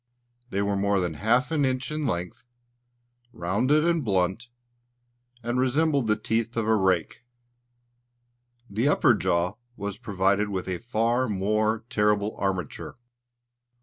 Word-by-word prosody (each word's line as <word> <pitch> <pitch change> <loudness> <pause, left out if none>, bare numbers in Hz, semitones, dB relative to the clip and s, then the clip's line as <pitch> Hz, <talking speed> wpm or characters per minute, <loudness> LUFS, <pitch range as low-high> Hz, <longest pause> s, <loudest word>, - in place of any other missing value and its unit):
They 100 -3 -1
were 100 0 0
more 100 0 +1
than 90 -3 -1
half 120 - +1
an 155 -3 +1
inch 130 +1 -1
in 150 -2 -2
length, 90 0 -3 0.9
rounded 125 - +1
and 170 -3 +1
blunt, 95 +2 0 1.0
and 120 +2 -1
resembled 140 0 +2
the 110 - +3
teeth 115 +2 -2
of 110 -1 0
a 110 - +4
rake. 95 0 0 1.4
The 110 +6 0
upper 130 -3 +4
jaw 90 -2 0 0.2
was 100 +1 -5
provided 100 -2 +1
with 95 -2 -3
a 90 -1 -3
far 120 +2 0
more 110 +3 0
terrible 105 -2 +1
armature. 95 -5 -3
110 Hz, 130 wpm, -26 LUFS, 95-125 Hz, 1.4 s, a